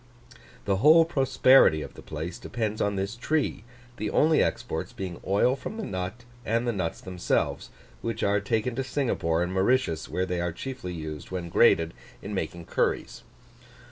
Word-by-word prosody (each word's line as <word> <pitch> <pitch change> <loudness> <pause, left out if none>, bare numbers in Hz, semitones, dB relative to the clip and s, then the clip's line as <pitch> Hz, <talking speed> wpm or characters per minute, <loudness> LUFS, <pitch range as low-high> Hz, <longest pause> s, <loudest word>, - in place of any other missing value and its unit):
The 100 -1 +1
whole 155 - +7
prosperity 135 - +4
of - - -9
the - - -12
place 80 +3 -6
depends 110 -3 -3
on 100 0 +1
this 100 +3 -2
tree: 145 -1 -1 0.3
the 105 - -2
only 155 0 +4
exports - - -2
being 95 -3 -6
oil 100 +7 +3
from 220 - -7
the 220 - -4
nut, 95 +6 -5 0.2
and 115 +2 0
the 120 - +1
nuts 90 -5 -3
themselves, 90 -2 -1 0.3
which 115 -1 -3
are 100 +1 +3
taken 110 +4 -1
to 135 - 0
Singapore 90 - 0
and 90 +1 -3
Mauritius, 95 -4 +1
where 90 - -1
they 90 -1 -2
are 85 0 -1
chiefly 90 -5 -6
used, 75 -2 -6
when 90 -2 -4
grated, 80 0 +4 0.3
in 100 - -5
making 85 -2 -4
curries. - - -1
100 Hz, 170 wpm, -27 LUFS, 90-125 Hz, 0.3 s, whole